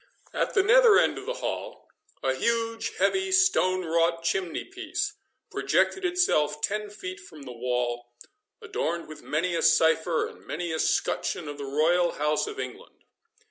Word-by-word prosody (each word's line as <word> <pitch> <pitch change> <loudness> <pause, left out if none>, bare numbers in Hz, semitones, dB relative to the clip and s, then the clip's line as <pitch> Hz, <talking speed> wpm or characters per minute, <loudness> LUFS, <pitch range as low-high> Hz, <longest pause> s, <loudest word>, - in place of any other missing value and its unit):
At - - -1
the 385 - +5
nether 465 0 +6
end - - +2
of 400 - -11
the - - -2
hall, - - -5 0.4
a 130 - +2
huge, 230 - -1
heavy, 380 - +1
stone 185 - +3
wrought 165 +1 +1
chimney 175 0 -1
piece 380 +1 -4 0.4
projected 385 - +1
itself 155 - +2
ten 210 +5 -2
feet 375 - -7
from 155 - -13
the 130 - -8
wall, 120 0 -2 0.6
adorned 170 +1 -3
with 155 - -10
many 170 +4 -1
a 165 - 0
cipher, 160 +1 +3
and - - -11
many 170 +1 -3
a 160 - -2
scutcheon 165 - 0
of 145 0 -7
the 140 - -4
Royal 165 +5 +2
House 150 - 0
of 425 -1 -7
England. - - -8
175 Hz, 160 wpm, -27 LUFS, -, 0.6 s, nether